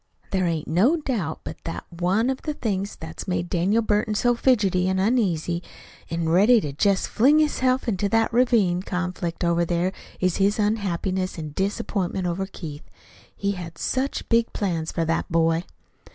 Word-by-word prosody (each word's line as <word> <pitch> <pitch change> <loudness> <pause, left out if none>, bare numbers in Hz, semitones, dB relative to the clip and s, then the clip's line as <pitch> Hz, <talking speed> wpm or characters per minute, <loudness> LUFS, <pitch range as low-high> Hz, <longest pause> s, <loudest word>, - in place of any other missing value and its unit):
There 185 -2 +1
ain't 165 -3 -2
no 215 - +3
doubt 220 - -3
but - - -7
that 165 - -5
one 185 +8 +1
of 265 - -5
the 300 -1 -3
things 200 -5 -2
that's 160 +4 -8
made 175 -1 -2
Daniel 195 +6 +2
Burton 210 0 +1
so 240 +3 +3
fidgety 205 -7 +2
an' 190 0 +1
uneasy, 190 -6 +1 0.5
an' 165 0 -1
ready 205 +9 +5
to 145 -8 -4
jest 195 +6 +2
fling 275 +7 +4
hisself 260 -4 +2
into 200 -2 0
that 225 +1 +2
ravin' 230 -8 +3
conflict 180 -2 -3
over 170 0 +2
there 175 +2 0 0.3
is 185 -2 +1
his 200 +1 +2
unhappiness 190 -3 -1
an' 155 -2 -5
disappointment 195 -2 -1
over 180 +2 -2
Keith. 155 -6 -9 0.5
He 200 0 -1
had 170 -4 -7
such 265 - -2
big 230 0 +2
plans 165 -5 -2
for 165 - -1
that 165 +1 -1
boy!" 165 +1 +2
190 Hz, 165 wpm, -24 LUFS, 170-225 Hz, 0.5 s, ready